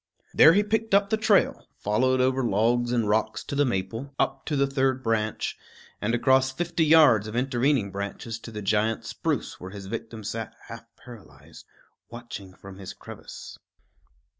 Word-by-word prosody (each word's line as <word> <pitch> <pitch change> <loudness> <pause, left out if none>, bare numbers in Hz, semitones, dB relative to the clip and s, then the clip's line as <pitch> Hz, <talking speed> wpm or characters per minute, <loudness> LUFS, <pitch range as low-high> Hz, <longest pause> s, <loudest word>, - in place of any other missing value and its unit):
There 160 - +8
he 205 +3 +3
picked 220 0 0
up 200 0 +2
the - - +4
trail, 215 -2 +2
followed 130 +5 +1
over 130 +1 +1
logs 120 +3 +1
and 115 -3 +1
rocks 110 0 0
to - - -7
the 145 0 +2
maple, 115 +5 -3
up - - -1
to 150 - -1
the 140 0 +3
third 135 -1 0
branch, 110 -2 -1 0.5
and 115 +3 0
across 130 +2 +3
fifty 170 +3 -1
yards 150 -9 +6
of 110 - -7
intervening 125 -3 +1
branches 100 +3 -5
to 115 - -10
the 105 -1 -6
giant 110 +2 0
spruce - - -3
where 90 - -8
his 100 0 -9
victim 115 +1 -6
sat 110 +1 -5
half 115 0 -9 0.2
paralyzed, 120 -5 -14 0.4
watching 115 -6 -9
from 100 0 -12
his 95 0 -8
crevice. 100 - -11
120 Hz, 165 wpm, -26 LUFS, 105-135 Hz, 0.5 s, There